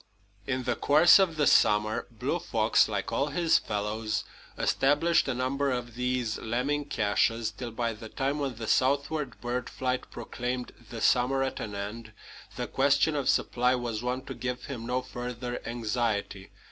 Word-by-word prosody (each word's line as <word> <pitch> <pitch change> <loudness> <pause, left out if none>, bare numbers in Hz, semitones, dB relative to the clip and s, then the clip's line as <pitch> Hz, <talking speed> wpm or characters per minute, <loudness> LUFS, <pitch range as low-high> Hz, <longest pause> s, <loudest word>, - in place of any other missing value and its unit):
In 130 -1 -1
the 120 -1 0
course 155 +7 +6
of 185 -4 +2
the 145 - +3
summer, 105 -2 +3
Blue 125 +9 -2
Fox, 115 -11 +2
like 100 -1 -3
all 135 +5 +1
his 165 +2 +3
fellows, 105 +1 -2 0.3
established 145 +5 +2
a 130 - -1
number 135 +3 0
of 120 -2 -3
these 125 -2 -1
lemming 135 +6 -1
caches, 110 -1 +1
till 120 +2 -6
by 115 0 -2
the 110 +1 -10
time 140 +5 -1
when 135 -4 -2
the 110 0 -6
southward 140 +3 +1
bird 125 0 -3
flight 130 -1 -2
proclaimed 125 +1 -4 0.2
the 115 -2 -6
summer 135 +2 +3
at 135 - -3
an 105 -1 -5
end, 105 +2 -6 0.4
the - - -3
question 140 +3 +2
of 140 -2 0
supply 125 +1 +2
was 120 -3 -3
one 125 +1 -2
to - - -6
give 125 0 -4
him 120 -4 -6
no 125 +1 -1
further 125 -1 -5
anxiety. 110 -4 -2
125 Hz, 165 wpm, -28 LUFS, 115-135 Hz, 0.4 s, course